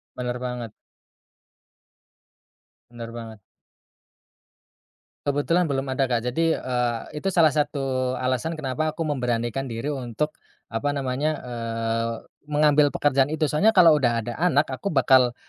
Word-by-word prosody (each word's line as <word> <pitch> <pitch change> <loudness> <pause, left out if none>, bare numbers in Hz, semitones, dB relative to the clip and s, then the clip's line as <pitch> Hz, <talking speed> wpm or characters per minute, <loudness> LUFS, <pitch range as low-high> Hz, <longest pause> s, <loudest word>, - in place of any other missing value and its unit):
Bener 125 0 -3
banget. 125 -3 -5 2.2
Bener 115 -1 -8
banget. 115 -2 -8 1.9
Kebetulan 145 +5 +1
belum 140 -3 -1
ada 130 +1 +1
Kak. 120 -3 0
Jadi, 165 +5 +1
eee, 125 -2 -1 0.2
itu 190 +6 -1
salah 160 -3 +6
satu 135 -3 -1
alasan 130 +5 -1
kenapa 155 0 -2
aku 165 - -6
memberanikan 125 -2 -1
diri 115 +3 -4
untuk 140 +2 -3 0.3
apa 120 +6 -1
namanya, 140 +2 -1 0.2
eee, 115 -1 -2 0.3
mengambil 150 0 +4
pekerjaan 140 -2 +3
itu. 155 +2 -2
Soalnya 210 +9 +3
kalo 175 -3 +8
udah 120 -7 +2
ada 120 - -4
anak, 155 -5 +2
aku 130 +10 -4
bakal 130 -6 +4
130 Hz, 125 wpm, -24 LUFS, 120-150 Hz, 2.2 s, kalo